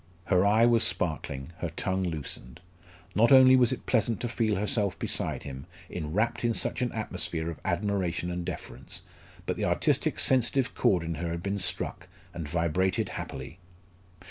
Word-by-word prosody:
Her 90 -2 +3
eye 110 +3 +5
was 120 -1 +4
sparkling, 80 -6 -2
her 85 - -2
tongue 95 +4 -2
loosened. 80 -4 -4 0.5
Not 115 +6 +4
only 130 -1 +8
was 125 -1 +4
it 130 - -4
pleasant 115 -2 +1
to 120 - -1
feel 110 -2 0
herself 105 -1 0
beside - - +1
him, 70 +2 -8 0.2
enwrapped 105 +10 -1
in 115 -1 +1
such - - -1
an 125 - 0
atmosphere 90 -6 -2
of 80 - -9
admiration 90 -4 -1
and 90 0 -3
deference, - - -6 0.4
but - - -2
the - - -1
artistic - - +1
sensitive 130 0 +3
chord 90 -4 +2
in 85 0 -3
her 85 - -2
had 85 +1 -4
been 100 0 -2
struck, 90 -1 -2 0.3
and 80 -3 -5
vibrated 85 +3 0
happily. 90 - -7
95 Hz, 165 wpm, -28 LUFS, 85-115 Hz, 0.5 s, only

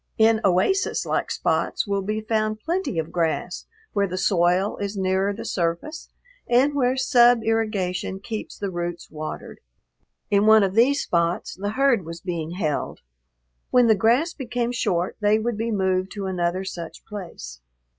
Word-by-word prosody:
In 220 0 +4
oasis 195 - +2
like - - -1
spots - - 0
will 200 -1 -1
be 215 +3 -2
found 215 0 -1
plenty 340 - -2
of 160 -1 -2
grass 165 -2 -2 0.3
where 200 -1 +1
the 185 0 -4
soil 185 +1 +2
is 200 0 -4
nearer 190 +1 +1
the 205 - -7
surface 175 - -3 0.4
and 255 +4 +4
where 260 -2 +1
sub 245 -3 +5
irrigation 210 -5 -1
keeps 215 +2 -6
the 200 -2 -3
roots 175 -1 -5
watered. 155 0 -7 0.7
In 205 +1 +3
one 220 -1 +7
of 190 -1 0
these 255 +6 +3
spots 170 +2 0
the 205 +3 -4
herd 265 -6 +3
was 165 +1 -8
being 170 -2 -4
held. 155 -6 -2 0.7
When 250 -1 +5
the 225 - +6
grass 235 - +2
became 245 -2 -2
short 180 -7 -1
they 210 0 +3
would 230 +1 -2
be 225 +2 -2
moved 190 -3 0
to 200 -2 -5
another 180 0 -1
such 170 -3 -7
place. 115 - -8
200 Hz, 160 wpm, -23 LUFS, 180-225 Hz, 0.7 s, one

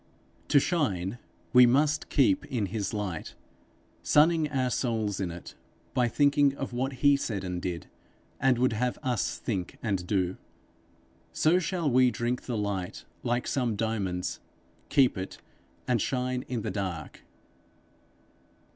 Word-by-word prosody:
To 145 - +5
shine, 120 - -1 0.3
we 125 -1 +8
must 150 +5 +2
keep 290 -2 +3
in 115 -6 -1
his 105 -4 -2
light, 100 -7 -4 0.7
sunning 155 0 +4
our 130 -3 0
souls 110 -6 -1
in 95 -3 -1
it 85 0 -9 0.4
by 125 -1 +2
thinking 140 +2 +3
of 135 - -4
what 130 +3 -1
he 145 0 +7
said 105 -8 -3
and 90 -1 -3
did, 85 -2 -4 0.5
and 130 -2 +3
would 125 0 +2
have 125 +3 -1
us 120 -9 -1
think 95 -6 -4
and 95 -6 -1
do. 95 -2 0 1.0
So 170 +4 +3
shall 175 -1 -1
we 130 -1 +5
drink 120 +2 -2
the 120 -3 -1
light 100 -3 -3 0.2
like 120 +1 -1
some 125 -5 0
diamonds, 100 -5 -2 0.5
keep 135 -8 +3
it, 95 - -6 0.5
and 120 -4 +2
shine 125 +1 -1
in 125 -3 -2
the - - -2
dark. 95 -6 -4
120 Hz, 140 wpm, -28 LUFS, 100-135 Hz, 1.0 s, we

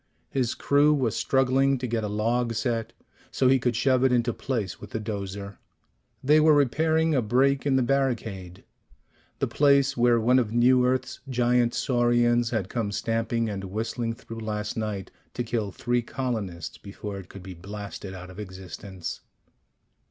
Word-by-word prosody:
His 130 -3 0
crew 145 +1 +3
was 125 -7 0
struggling 135 +1 +2
to 125 - -4
get 115 -2 -1
a - - -1
log 115 +3 0
set 115 0 -1 0.4
so 130 - +1
he 130 +1 +5
could 125 -2 0
shove 130 +1 +2
it 130 - +4
into 120 -1 +2
place 110 -8 -3
with - - -9
the 110 - -3
'dozer. 100 -2 -5 0.6
They 150 +3 +5
were 155 0 +6
repairing 160 +4 +2
a 135 - +3
break 135 +5 +2
in 135 - +3
the 130 - +3
barricade 115 -9 -2 0.7
the - - 0
place 140 -1 +3
where 120 -1 +4
one 125 +3 +4
of 115 -4 -1
New 125 +2 +4
Earth's 130 0 -1
giant 120 -1 +2
saurians 120 -1 +2
had 110 -6 -1
come 110 -2 -2
stamping 115 +2 -1
and 100 -2 -4
whistling 115 +3 -3
through 115 0 -9
last 105 -1 -3
night 105 -4 -4 0.2
to 120 - -1
kill 110 -3 -2
three 120 +4 0
colonists 110 -10 -4
before 100 0 -7
it 95 - -12
could 100 - -11
be 95 0 -8
blasted 100 +1 -8
out 90 0 -9
of 95 - -11
existence. 95 -2 -7
120 Hz, 165 wpm, -26 LUFS, 105-130 Hz, 0.7 s, were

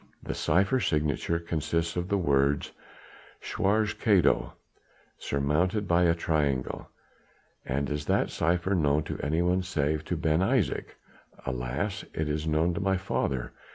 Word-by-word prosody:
The - - -3
cypher 100 +8 +2
signature 75 - 0
consists 85 0 -2
of 90 0 -2
the 100 +1 +1
words 70 -4 +1 0.7
'Schwarzer 105 +2 0
Kato' 100 -5 +3 0.7
surmounted 85 +9 0
by 85 +1 +4
a 85 -1 +4
triangle." 75 -6 -1 0.8
"And 70 +2 -1
is 75 0 -3
that - - +1
cypher 90 +3 +1
known 75 -4 +2
to - - -5
anyone 85 +5 +1
save 80 -4 -1
to 90 - -2
Ben 80 -1 +1
Isaje?" 95 - +1 0.6
"Alas! 70 - -2
it 80 - -1
is 75 +1 -2
known 80 +3 +2
to 85 - -3
my 95 0 +2
father. 70 -9 -2
85 Hz, 135 wpm, -28 LUFS, 75-90 Hz, 0.8 s, by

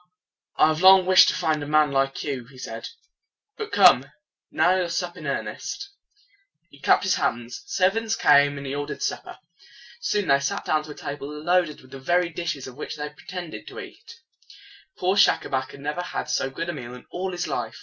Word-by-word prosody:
"I 155 - +5
have 155 +1 -1
long 190 0 +8
wished 185 0 +7
to - - -1
find 160 -4 0
a 145 - -5
man 150 -1 +3
like 135 0 0
you," 130 -5 -4
he 130 0 -16
said. - - -7 0.7
"But 435 -1 -6
come, 160 -9 +6 0.4
now 175 +3 +3
we 185 - +1
will 175 - -2
sup 175 +1 -3
in - - -8
earnest." 400 0 -4 0.8
He 140 - -17
clapped - - +4
his 190 - +2
hands. 120 +1 -2
Servants 220 +4 +1
came, 145 -5 +4
and 140 - -7
he 135 - -4
ordered 145 0 -4
supper. - - -4 0.6
Soon 210 - -1
they 140 0 +5
sat 140 - -3
down 155 -1 +1
to - - -12
a 150 - -8
table 140 0 -6
loaded 160 +1 0
with 130 - -19
the 135 - -8
very 175 +6 +1
dishes 170 -5 -4
of 130 0 -10
which - - -6
they 150 - -6
had 150 0 -7
pre - - -19
tend 180 -3 -6
ed - - -9
to - - -8
eat. 370 - -12 0.8
Poor 185 +2 +1
Schacabac 130 -9 +2
had 140 - -12
never 150 +4 -3
had 165 -3 -4
so 135 - 0
good 165 +6 -5
a - - -2
meal 125 -4 -8
in 125 - -13
all 185 +1 -3
his 175 0 -3
life. - - -4
155 Hz, 215 wpm, -24 LUFS, 140-180 Hz, 0.8 s, long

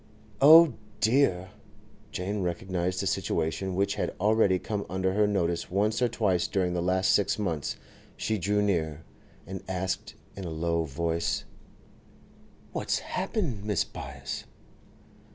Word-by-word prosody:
'Oh 160 +1 +9 0.3
dear!' 110 -7 +2 0.6
Jane 100 +2 -3
recognised 90 +1 -2
a - - -2
situation 95 -1 -1
which 100 +1 +1
had - - -3
already 105 -2 +3
come 100 +2 -3
under 95 +1 0
her 105 +1 +3
notice 85 -4 0
once 105 +5 +1
or 125 - +4
twice 100 -7 +1
during 90 -2 0
the 90 - -1
last 95 +2 +2
six 100 - +2
months. 85 -8 -2 0.4
She 110 -1 -1
drew 105 +3 +1
near, 80 -6 -1 0.4
and 95 +1 -6
asked 95 0 -3 0.2
in 100 - -6
a 85 - -4
low 85 +1 0
voice: 85 +3 -1 1.3
'What's - - -1
happened, 180 - -2
Mrs. 105 -4 -1
Byass? - - -6
95 Hz, 135 wpm, -28 LUFS, 90-105 Hz, 1.3 s, Oh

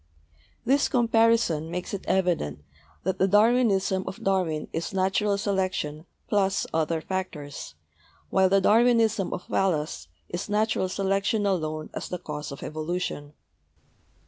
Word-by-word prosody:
This 275 +4 +3
comparison 230 - +3
makes 180 +3 -4
it 195 - -5
evident 170 - 0 0.4
that 190 +1 -1
the 190 - +4
Darwinism 205 -3 +3
of - - -7
Darwin 180 -6 0
is 170 +4 -3
natural 195 +2 +1
selection 185 -6 -2 0.2
plus 195 -1 +1
other 160 0 0
factors, 150 - -5 0.6
while 190 -1 +4
the 195 +1 +4
Darwinism 225 -2 +3
of 180 - -5
Wallace 155 - -1 0.2
is 175 +3 -5
natural 210 -2 +1
selection 195 +2 0
alone 155 -5 -1
as - - -5
the 180 - -3
cause 150 -4 -6
of 140 - -8
evolution. 155 -2 -4
190 Hz, 125 wpm, -26 LUFS, 160-205 Hz, 0.6 s, the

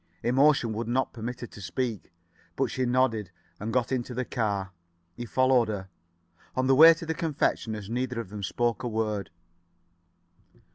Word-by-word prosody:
Emotion 130 -1 +3
would 115 +1 -3
not 130 +3 0
permit 120 +1 -6
her - - -3
to 105 - -12
speak. 110 +4 -3 0.4
But - - 0
she 130 -1 -1
nodded 120 -6 +1 0.3
and 110 +2 -4
got 125 +1 0
into 125 -1 -2
the 125 +1 -2
car. 100 -7 -2 0.4
He 120 0 -6
followed 130 -1 +3
her. 100 -3 -5 0.7
On 130 - +1
the 135 - +4
way 160 +4 +9
to 165 - -8
the 160 - -1
confectioner's 115 - -1
neither 125 +1 -2
of 115 -5 -6
them 105 0 -7
spoke 120 +4 -1
a 125 - -3
word. 110 -3 -2
120 Hz, 170 wpm, -27 LUFS, 110-130 Hz, 0.7 s, way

